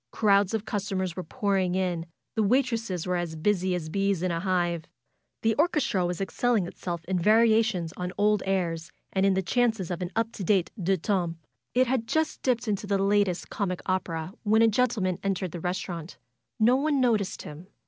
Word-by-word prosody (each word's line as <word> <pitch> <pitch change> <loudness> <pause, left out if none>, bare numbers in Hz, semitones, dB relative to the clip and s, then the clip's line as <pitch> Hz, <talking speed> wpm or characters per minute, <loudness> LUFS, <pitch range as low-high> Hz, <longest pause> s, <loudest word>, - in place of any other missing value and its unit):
Crowds 200 -1 +3
of 220 -1 -3
customers 190 -4 -2
were 185 - -3
pouring 190 +1 0
in. 175 -3 -1 0.3
The 220 - 0
waitresses 230 -5 +1
were 180 -1 0
as 170 -2 -3
busy 185 +2 +1
as 165 -3 -4
bees 195 +1 0
in 185 - +1
a 165 - -1
hive. 175 -3 0 0.6
The 225 0 +3
orches 305 -4 +2
tra 190 -5 +1
was 175 -1 -3
excelling 215 +1 +1
itself 170 -1 -5
in 185 +1 0
variations 215 -4 +3
on 180 0 -4
old 210 -1 +3
airs, 170 -4 -1 0.2
and 195 0 +3
in 195 - +3
the 190 - 0
chances 220 -2 +1
of 175 +1 -3
an 180 - -2
up 225 0 0
to 200 - -6
date 185 -1 +2
Deux 190 +2 +2
temps. 175 -2 -1 0.4
It 255 +1 +5
had 250 -2 -1
just 315 +4 0
dipped 245 -2 0
into 205 -1 -1
the 200 0 +2
latest 195 -2 +1
comic 185 -3 -2
opera 180 -2 -2
when 220 +1 +4
a - - +6
gentle 230 -1 +1
man 185 -2 -1
entered 195 -2 -1
the 175 - -6
restaurant. 180 -1 -4 0.4
No 240 +4 +5
one 290 0 +1
noticed 225 -6 +1
him. 155 +4 -10
195 Hz, 195 wpm, -27 LUFS, 180-220 Hz, 0.6 s, a